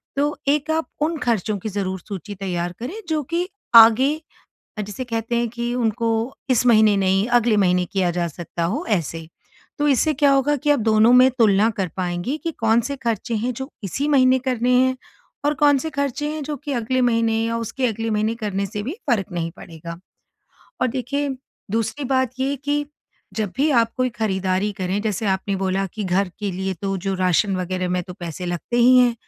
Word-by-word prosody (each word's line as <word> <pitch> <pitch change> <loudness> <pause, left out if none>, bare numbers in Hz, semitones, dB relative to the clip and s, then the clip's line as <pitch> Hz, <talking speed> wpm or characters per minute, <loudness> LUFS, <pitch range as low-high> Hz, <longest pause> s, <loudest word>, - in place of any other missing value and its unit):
तो 290 +1 0
एक 295 +1 +1
आप 320 0 0
उन 315 +2 0
खर्चों 220 -5 0
की 215 - -4
ज़रूर 190 -2 -3
सूची 200 0 -6
तैयार 175 -2 -3
करें, 255 +10 -5 0.2
जो 305 -2 0
कि 340 +5 -2 0.3
आगे 255 +7 +7 0.6
जिसे 210 +5 -6
कहते 230 0 -2
हैं 235 0 +1
कि 240 +1 -3
उनको 230 -1 0 0.4
इस 250 -1 +3
महीने 215 -3 +5
नहीं 195 +1 +2
अगले 230 -2 +2
महीने 180 -2 +3
किया 185 -3 +1
जा 175 0 -1
सकता 170 +1 -5
हो 235 - -1
ऐसे। 165 -5 -2 0.5
तो 295 0 +2
इससे 295 +3 +2
क्या 285 0 +3
होगा 280 +2 +2
कि 295 +2 -1
आप 290 - +4
दोनों 220 +2 +4
में 255 +1 +7
तुलना 215 0 +4
कर 190 -2 0
पाएँगी 180 +9 -2
कि 330 - -1
कौन 225 +1 +4
से 280 - -3
खर्चे 230 -2 -2
हैं 240 +4 -1
जो 265 +4 -6
इसी 275 - -2
महीने 260 -2 +4
करने 250 0 +1
हैं? 260 0 +2 0.5
और 295 +1 +2
कौन 290 -2 +4
से 320 +4 -4
खर्चे 280 0 -2
हैं 310 -1 -4
जो 295 0 -4
कि 285 +1 -6
अगले 255 +3 0
महीने 230 -2 +2
या 230 0 -1
उसके 250 +3 -2
अगले 225 0 -2
महीने 215 +2 0
करने 200 -3 -2
से 205 +2 -5
भी 275 - -3 0.2
फ़र्क 205 -5 +1
नहीं 165 -1 -2
पड़ेगा। 170 +1 -9 0.8
और - - +4
देखिए 270 +3 -2 0.4
दूसरी 230 +6 -1
बात 260 -2 +1
ये 275 +2 0
कि 290 0 0 0.5
जब 210 -4 -2
भी 290 +3 +2
आप 230 -3 +3
कोई 255 0 +2
ख़रीदारी 190 -3 -1
करें, 190 0 -2
जैसे 215 -1 -2
आपने 195 +1 0
बोला 195 0 -1
कि 215 -2 -3
घर 185 +1 +1
के 205 -1 -1
लिए 190 +1 -2
तो 195 0 -1
जो 195 +1 -2
राशन 185 +1 +2
वग़ैरह 185 0 -2
में 180 0 0
तो 180 - -9
पैसे 175 -1 -6
लगते 175 +7 -3
ही 250 +2 +6
हैं 245 -1 +4
225 Hz, 200 wpm, -22 LUFS, 195-260 Hz, 0.8 s, आगे